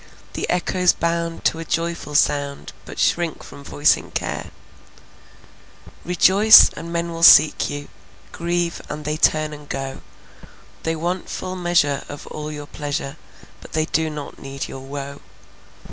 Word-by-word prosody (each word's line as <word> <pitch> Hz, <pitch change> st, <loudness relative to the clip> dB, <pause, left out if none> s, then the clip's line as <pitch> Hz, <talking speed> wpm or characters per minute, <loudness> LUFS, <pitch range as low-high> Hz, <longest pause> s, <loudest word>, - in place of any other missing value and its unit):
The -, -, -4 dB
echoes 180 Hz, 0 st, +2 dB
bound 170 Hz, 0 st, -2 dB
to 160 Hz, -, +2 dB
a -, -, -4 dB
joyful 165 Hz, -2 st, -3 dB
sound, 145 Hz, -1 st, 0 dB
But -, -, -10 dB
shrink 170 Hz, -2 st, 0 dB
from 140 Hz, -, -12 dB
voicing 145 Hz, +1 st, +1 dB
care. -, -, -4 dB, 1.5 s
Rejoice, 195 Hz, +5 st, +7 dB
and 170 Hz, -, -7 dB
men 170 Hz, 0 st, -2 dB
will 165 Hz, 0 st, -6 dB
seek 155 Hz, -2 st, +7 dB
you; 145 Hz, 0 st, -6 dB, 0.4 s
Grieve, 170 Hz, 0 st, -2 dB
and 150 Hz, 0 st, -6 dB
they 150 Hz, +1 st, -1 dB
turn 155 Hz, -1 st, +2 dB
and 150 Hz, -1 st, -12 dB
go. 135 Hz, 0 st, -5 dB, 0.8 s
They 165 Hz, 0 st, -2 dB
want 175 Hz, +3 st, -3 dB
full 185 Hz, 0 st, -5 dB
measure 175 Hz, -6 st, +1 dB
of 145 Hz, -, -8 dB
all 150 Hz, 0 st, -6 dB
your 145 Hz, -1 st, -7 dB
pleasure, 145 Hz, -2 st, -5 dB, 0.5 s
But -, -, -13 dB
they 155 Hz, 0 st, +1 dB
do 160 Hz, 0 st, 0 dB
not 150 Hz, -2 st, -8 dB
need 135 Hz, 0 st, -6 dB
your 135 Hz, -, -8 dB
woe. 140 Hz, +1 st, -7 dB
155 Hz, 145 wpm, -21 LUFS, 145-170 Hz, 1.5 s, Rejoice